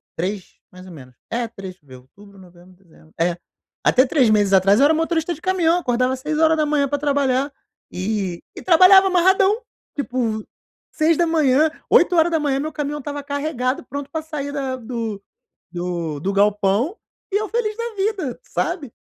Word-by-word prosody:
3 190 +2 -5
mais 185 0 -13
ou - - -11
menos, 130 -4 -13 0.2
é, 235 0 -1
3 190 -4 -10
ver 130 -2 -14
outubro, 200 +10 -18
novembro, 180 0 -17
dezembro. 160 -2 -22
È, 170 +1 +1 0.5
até 255 +2 +4
3 255 -4 +2
meses 205 -2 +3
atrás 195 +4 +5
eu 280 - +6
era 315 - +4
motorista 325 +1 0
de 320 - -13
caminhão, 355 -2 +2
acordava 255 -2 0
6h 305 0 +1
pra 290 - 0
trabalhar, 280 -1 0 0.4
e 185 -2 -3
e - - -8
trabalhava 375 +2 +7
amarradão. 380 +4 +3 0.3
Tipo, 245 -6 -2 0.5
6h, 315 -3 +2 0.2
8h 320 -5 +3
meu 310 +2 -4
caminhão 295 0 -3
estava 290 0 -6
carregado, 280 -3 -2
pronto 285 +1 -6
pra 320 -1 -3
sair 295 -3 -5
da 270 -2 -3
do 230 -4 -5 0.5
do 175 -4 -4
do 195 +4 -2
galpão 205 - +1 0.4
e - - +2
eu 430 -1 -3
feliz 440 -2 -2
da 470 -1 -5
vida, 390 - -2
sabe. 335 - -3
275 Hz, 155 wpm, -21 LUFS, 205-320 Hz, 0.5 s, trabalhava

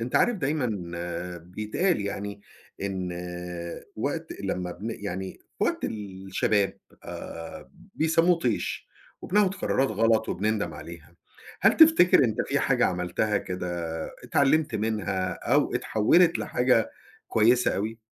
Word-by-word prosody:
أنت 120 +2 -1
عارف 240 -2 +3
دايمًا 145 - 0 0.7
بيتقال 105 - -1
يعني، 100 0 -4 0.4
إن 95 -2 -2 0.9
وقت - - -3
لما 90 -1 -2
بن 105 +6 -6
يعني 95 -1 -4 0.3
في - - +2
وقت - - -1
الشباب 100 0 -1 0.3
آآ، 80 0 -8 0.2
بيسموه 165 +2 +3
طيش 120 -8 -2 0.3
وبناخذ 205 0 +3
قرارات 135 -7 0
غلط 110 +1 +2
وبنندم 105 +2 -1
عليها، 85 -1 -11 0.5
هل - - +5
تفتكر 315 - +7
أنت 110 - 0
في - - +2
حاجة - - +3
عملتها 90 +4 0
كده 90 -1 -5 0.6
اتعلمت 145 -1 +2
منها 100 -4 -1
أو - - +1
اتحولت 165 +11 +3
لحاجة 125 -3 +2 0.4
كويسة 120 +3 +3
أوي؟ 110 +3 -3
110 Hz, 115 wpm, -27 LUFS, 95-135 Hz, 0.9 s, تفتكر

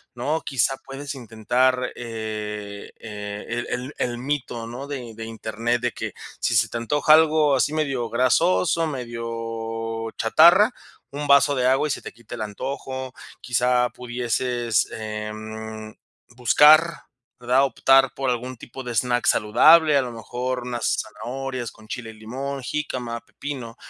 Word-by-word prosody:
¿no? 145 +6 -1
Quizá 135 0 +1
puedes 140 +1 -6
intentar, 125 +1 0
e 105 -3 -6
el 105 +2 -5
e - - -2
el 125 +4 -6
el 120 -1 -1
mito, 125 -3 -3
¿no? 125 +5 -7
De 125 -5 -6
de 115 +1 -7
Internet, 115 +2 -2
de 125 - +1
que, - - -6 0.3
si - - 0
se 115 +1 +4
te 110 - -5
antoja 145 +6 +3
algo 155 -2 +5
así 140 +3 +1
medio 135 -7 -1
grasoso, 160 +7 +2
medio 115 -3 -4
chatarra, 170 - +6 0.4
un 145 +1 -4
vaso 140 0 +6
de 125 -1 +2
agua 135 +4 +3
y - - 0
se - - -3
te - - -9
quita 120 +1 -10
el 115 - -7
antojo. 130 +4 -5 0.3
Quizá 125 0 +2
pudieses, 120 -2 -1
em, 110 0 -6 0.4
buscar, 155 +7 +5 0.3
¿verdad? 125 +3 +3
Optar 135 +1 +4
por 135 -1 -2
algún 125 +1 -2
tipo 125 +3 -10
de 125 -1 -5
snack 120 +2 +1
saludable. 150 +8 +6
A - - +4
lo 120 -1 -6
mejor 125 +3 -4
unas 120 -1 -1
zanahorias 125 +3 -5
con 110 0 -18
chile 115 -3 -5
y - - -14
limón, 130 +6 -5
jícama, 125 -5 -3
pepino, 125 -6 -7
125 Hz, 150 wpm, -23 LUFS, 115-135 Hz, 0.4 s, chatarra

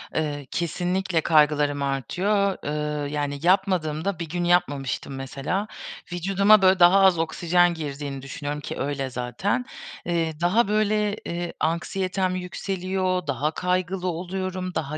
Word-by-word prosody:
Eee, 145 -3 -2
kesinlikle 175 +1 -1
kaygılarım 150 -2 +3
artıyor. 185 - 0
Iıı, 150 0 -2
yani 145 -1 -2
yapmadığımda, 180 -2 +1
bir 165 -2 -5
gün 175 +1 -2
yapmamıştım 145 -7 0
mesela. 135 +10 -3 0.4
Vücuduma 195 +4 +4
böyle 185 0 +5
daha 175 +3 +7
az 190 -3 +5
oksijen 175 +2 +2
girdiğini 140 -3 -5
düşünüyorum 145 +2 -5
ki - - -6
öyle 135 -2 -2
zaten. 130 - -2 0.4
Eee, 165 -2 0
daha 195 +6 +3
böyle, 210 0 +1
eee, 170 0 -4
anksiyetem 185 +3 -1
yükseliyor, 185 -1 -2
daha 140 +2 0
kaygılı 180 +1 -1
oluyorum, 185 +1 -3
daha 155 0 -2
175 Hz, 125 wpm, -24 LUFS, 150-185 Hz, 0.4 s, daha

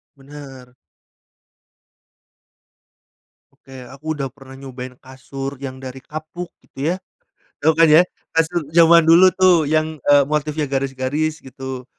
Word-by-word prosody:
Bener. 135 -3 -13 2.8
Oke, 130 -1 -13
aku 140 +3 -16
udah 135 -1 -2
pernah 135 -1 -14
nyobain 130 -1 -9
kasur 135 +1 -8
yang 130 -1 -6
dari 130 0 -9
kapuk 155 +4 -8
gitu 135 - -17
ya, - - -3 0.7
tau 160 +2 +4
kan 165 -1 +6
ya 155 +3 +7 0.3
kasur 165 +1 +1
zaman 170 0 +6
dulu 175 +3 +7
tuh 185 -4 +4
yang, 155 0 0
eee, 145 -1 +6
motifnya 150 0 -2
garis-garis 135 +3 -2
gitu, 130 -1 -8
140 Hz, 120 wpm, -20 LUFS, 130-160 Hz, 2.8 s, ya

